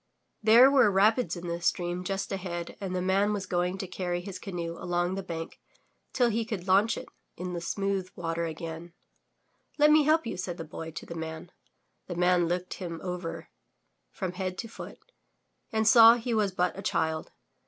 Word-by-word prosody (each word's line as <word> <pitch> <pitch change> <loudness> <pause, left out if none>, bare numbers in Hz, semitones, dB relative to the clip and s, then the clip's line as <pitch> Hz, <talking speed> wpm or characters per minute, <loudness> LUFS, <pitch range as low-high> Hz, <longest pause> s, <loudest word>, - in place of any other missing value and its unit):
There 235 +5 +7
were 265 -6 +5
rapids 215 +5 +3
in 175 0 -7
the 170 0 -3
stream 175 +1 -1
just 195 +1 -3
ahead 175 -3 -4
and 185 -2 -3
the 180 - -1
man 195 +3 +2
was 200 -2 -3
going 180 +1 -1
to 190 - -5
carry 180 -1 -3
his 185 0 -7
canoe 170 -4 -5
along 175 +1 -1
the 195 - -3
bank 165 -3 -6 0.5
till 245 -2 +2
he 225 +2 0
could 215 -5 -5
launch 200 +4 +4
it - - -7 0.3
in 180 -1 -4
smooth 195 +1 -2
water 170 0 -2
again. 165 +1 -7 0.9
'Xet 300 +1 +6
me 310 0 +7
help 310 +1 +3
you, 230 - -4
said 180 -1 -4
the 165 - -5
Boy 160 +1 -7
to 160 - -8
the - - -7
Man. 160 +1 -6 0.6
The 175 - -5
Man 180 0 +3
looked 180 +1 -2
him 170 -3 -6
over 180 -2 -5 0.6
from 180 - -4
head 185 0 -4
to 230 - -5
foot 225 - -9 0.7
and 220 -1 +1
saw 230 +1 +9
he 240 0 -3
was 210 -3 +2
but 180 -1 0
a 195 - -6
child. 160 -4 -1
185 Hz, 185 wpm, -28 LUFS, 175-205 Hz, 0.9 s, saw